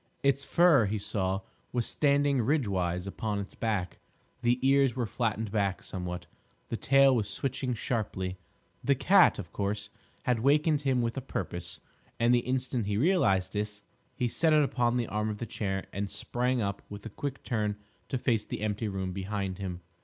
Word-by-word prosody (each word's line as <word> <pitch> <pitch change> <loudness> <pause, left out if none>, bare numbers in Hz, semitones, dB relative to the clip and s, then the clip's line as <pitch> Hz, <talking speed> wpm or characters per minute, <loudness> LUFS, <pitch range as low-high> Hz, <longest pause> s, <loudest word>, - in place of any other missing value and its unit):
Its 140 0 +3
fur, 160 - +5
he 105 +2 -1
saw, 95 -1 -1 0.3
was 120 -2 0
standing 140 -2 +2
ridgewise 95 - 0
upon 105 +1 -3
its 100 -1 -5
back; 105 -6 -2 0.4
the 120 +1 +3
ears 135 -3 +4
were 125 -2 0
flattened 110 -1 -1
back 100 -3 0
somewhat; 90 -1 -5 0.4
the - - -1
tail 135 +2 +5
was 105 -3 0
switching 130 +2 -2
sharply. 95 -6 -2 0.4
The 140 - +3
cat, 195 +9 +5
of 90 -5 -7
course, 100 0 -2 0.3
had 125 -2 +1
wakened 150 +4 +3
him 130 -4 +1
with 115 +1 -2
a - - -1
purpose, 85 -9 -5 0.4
and 120 +1 +4
the 120 - +5
instant 125 -3 -1
he 105 -1 0
realised 120 - +3
this, 105 0 -3 0.3
he 125 - 0
set 160 +6 +2
it 150 -1 +6
upon 125 -3 +1
the 120 - +1
arm 105 +1 -1
of 105 - -3
the 120 - -4
chair 95 -3 -3
and 100 0 -2
sprang 125 +3 -1
up 100 0 -2
with 105 +1 -8
a - - -4
quick 135 +5 -5
turn 105 -3 -1 0.3
to 130 - 0
face 115 -3 +1
the - - -6
empty 110 +1 -1
room 95 -2 -3
behind 100 0 -3
him. 90 -2 -4
110 Hz, 180 wpm, -29 LUFS, 100-130 Hz, 0.4 s, it